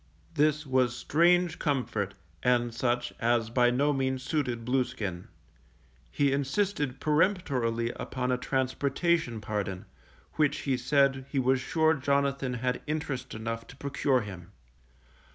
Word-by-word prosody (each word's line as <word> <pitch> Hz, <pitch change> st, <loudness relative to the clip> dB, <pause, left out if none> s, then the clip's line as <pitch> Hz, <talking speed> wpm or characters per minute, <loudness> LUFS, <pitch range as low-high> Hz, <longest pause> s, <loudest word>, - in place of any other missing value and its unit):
This 150 Hz, +1 st, +2 dB
was 130 Hz, -2 st, +2 dB
strange 175 Hz, +3 st, +3 dB
comfort, 110 Hz, -9 st, -1 dB, 0.3 s
and 120 Hz, -1 st, +2 dB
such 120 Hz, +1 st, -1 dB
as 115 Hz, -1 st, +1 dB
by 120 Hz, 0 st, +4 dB
no 140 Hz, +4 st, +2 dB
means 130 Hz, -1 st, -1 dB
suited 130 Hz, -5 st, -2 dB
Blueskin: 120 Hz, -7 st, -2 dB, 0.8 s
he 140 Hz, -2 st, +1 dB
insisted 140 Hz, 0 st, -1 dB
peremptorily 145 Hz, -, +1 dB
upon 125 Hz, -1 st, -3 dB
a 125 Hz, -, +2 dB
transportation 135 Hz, +1 st, 0 dB
pardon, 100 Hz, -3 st, -3 dB, 0.5 s
which 150 Hz, -2 st, +1 dB
be 135 Hz, -2 st, +2 dB
said 135 Hz, +1 st, +2 dB
he 140 Hz, -, -4 dB
was 130 Hz, 0 st, +2 dB
sure 160 Hz, +3 st, +2 dB
Jonathan 140 Hz, -2 st, 0 dB
had 125 Hz, +1 st, -1 dB
interest 140 Hz, -5 st, -3 dB
enough 115 Hz, +1 st, -4 dB
to -, -, -12 dB
procure 140 Hz, -1 st, 0 dB
him. 95 Hz, -3 st, -9 dB
130 Hz, 125 wpm, -29 LUFS, 120-145 Hz, 0.8 s, by